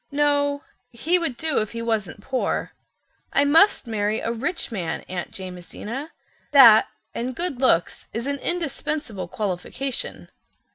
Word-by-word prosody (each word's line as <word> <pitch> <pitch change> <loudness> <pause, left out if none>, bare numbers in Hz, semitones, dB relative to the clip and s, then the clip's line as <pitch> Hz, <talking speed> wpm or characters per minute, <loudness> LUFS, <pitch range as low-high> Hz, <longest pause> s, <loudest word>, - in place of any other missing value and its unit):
"No, 285 0 +1 0.3
he 325 +9 +1
would 275 -8 -2
do 315 0 +1
if 215 +1 -3
he 230 - -4
wasn't 210 -5 -2
poor. 260 +2 -2 0.6
I 285 - +3
must 325 +4 +5
marry 215 -1 -1
a 230 - -2
rich 275 +7 -2
man, 175 -7 -3
Aunt 180 -1 -5
Jamesina. 190 - -7 0.4
That—and 240 0 +5
good 335 -6 -2
looks—is 230 +1 +1
an 280 0 -2
indispensable 295 - -2
qualification. 210 +8 -4
250 Hz, 125 wpm, -24 LUFS, 210-285 Hz, 0.6 s, must